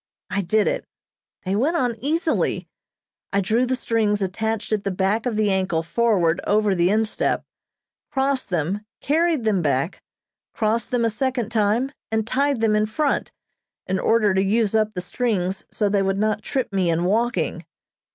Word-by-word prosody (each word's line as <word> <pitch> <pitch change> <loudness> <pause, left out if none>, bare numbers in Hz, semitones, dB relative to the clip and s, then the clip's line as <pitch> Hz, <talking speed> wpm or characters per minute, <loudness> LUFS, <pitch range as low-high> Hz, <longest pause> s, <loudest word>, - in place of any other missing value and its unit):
I 200 0 +1
did 210 +3 +2
it. - - -1 0.6
They 190 +1 -1
went 295 +11 +1
on 245 -6 0
easily. 315 +5 0 0.6
I 200 - +2
drew 225 +6 +1
the 260 - +1
strings 220 -4 +1
attached 220 +4 -2
at 210 -2 0
the - - -1
back 195 +5 0
of 235 - -1
the 210 -1 +2
ankle 185 -4 0
forward 180 -4 +2
over 210 -1 +3
the 175 -1 +2
instep, 220 +1 0 0.7
crossed 270 -1 0
them, 180 +4 -1 0.2
carried 320 -2 +1
them 210 -4 +2
back, 140 +2 -1 0.5
crossed 225 +1 0
them 245 -2 +1
a 225 - +1
second 245 0 -1
time 225 +4 +1 0.2
and 220 -1 0
tied 275 +1 +1
them 220 -1 +3
in 215 0 +2
front, 285 +7 -1 0.5
in 190 0 -1
order 215 -2 +3
to 190 - +2
use 215 +1 +1
up 215 -1 +2
the 180 - -2
strings 190 -1 -1
so 210 - 0
they 200 0 +2
would 195 0 0
not 215 +1 0
trip 255 -2 -2
me 185 -3 +1
in 165 +1 +1
walking. 230 +6 0
215 Hz, 170 wpm, -23 LUFS, 195-240 Hz, 0.7 s, over